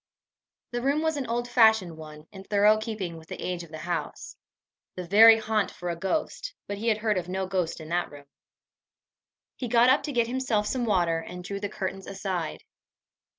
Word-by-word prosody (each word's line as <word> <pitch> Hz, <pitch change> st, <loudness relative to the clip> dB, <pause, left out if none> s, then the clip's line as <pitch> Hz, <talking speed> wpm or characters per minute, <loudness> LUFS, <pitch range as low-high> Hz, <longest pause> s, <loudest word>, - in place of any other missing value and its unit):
The 240 Hz, 0 st, -2 dB
room 280 Hz, +4 st, +1 dB
was 320 Hz, -1 st, +1 dB
an 275 Hz, -4 st, -3 dB
old 240 Hz, +1 st, -2 dB
fashioned 220 Hz, -8 st, +4 dB
one, 155 Hz, -1 st, -11 dB
in 190 Hz, -1 st, -10 dB
thorough 210 Hz, +2 st, +4 dB
keeping 210 Hz, -6 st, -5 dB
with 160 Hz, 0 st, -14 dB
the -, -, -7 dB
age 180 Hz, -1 st, -3 dB
of 170 Hz, -, -11 dB
the 155 Hz, -, -8 dB
house 170 Hz, +2 st, -5 dB, 0.6 s
the 180 Hz, -, -5 dB
very 220 Hz, +5 st, +8 dB
haunt 215 Hz, -2 st, 0 dB
for 175 Hz, -1 st, -5 dB
a -, -, -3 dB
ghost, 310 Hz, -, -3 dB
but 200 Hz, 0 st, -5 dB
he 225 Hz, -, -3 dB
had 220 Hz, -2 st, +3 dB
heard 215 Hz, -3 st, 0 dB
of 175 Hz, 0 st, -8 dB
no 190 Hz, +1 st, -2 dB
ghost 185 Hz, -3 st, -2 dB
in 155 Hz, -1 st, -9 dB
that 175 Hz, +1 st, 0 dB
room! 145 Hz, -1 st, -13 dB, 1.3 s
He 250 Hz, -, -4 dB
got 240 Hz, +1 st, +5 dB
up 275 Hz, -, +3 dB
to 295 Hz, -, -4 dB
get 240 Hz, -3 st, +2 dB
himself 240 Hz, -4 st, -1 dB
some 245 Hz, +2 st, -1 dB
water, 175 Hz, -6 st, +2 dB
and 180 Hz, +2 st, -8 dB
drew 200 Hz, +2 st, -5 dB
the 205 Hz, 0 st, -3 dB
curtains 195 Hz, -1 st, -5 dB
aside. 190 Hz, -4 st, -4 dB
200 Hz, 200 wpm, -27 LUFS, 175-230 Hz, 1.3 s, very